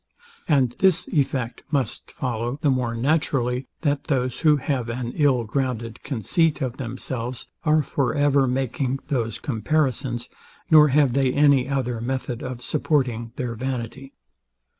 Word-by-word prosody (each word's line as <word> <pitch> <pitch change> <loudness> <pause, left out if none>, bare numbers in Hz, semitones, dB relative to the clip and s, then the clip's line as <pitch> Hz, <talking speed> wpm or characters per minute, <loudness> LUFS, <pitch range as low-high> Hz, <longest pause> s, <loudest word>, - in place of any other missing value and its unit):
And 135 -6 +3
this 180 -2 +3
effect 130 -5 -1
must 140 -3 -2
follow 120 0 -3
the 145 - +4
more 125 -3 0
naturally, 130 -1 0
that 145 -2 0
those, 130 -4 -1
who 155 -2 +4
have 130 -4 -2
an 120 0 -3
ill 140 -6 +3
grounded 115 -1 -3
conceit 150 - 0
of 130 -3 -3
themselves, 125 -1 -4 0.2
are 155 0 +4
for 140 -1 -1
ever 145 -2 +3
making 130 +1 -1
those 115 -7 -1
comparisons, 130 -1 -1 0.4
nor 150 -1 +8
have 140 -2 +3
they 135 -1 +2
any 140 -2 +4
other 125 -4 -1
method 125 -1 -3
of 125 -1 -6
supporting 125 -7 0
their 125 -2 -3
vanity. 130 +2 -5
130 Hz, 140 wpm, -24 LUFS, 120-145 Hz, 0.4 s, nor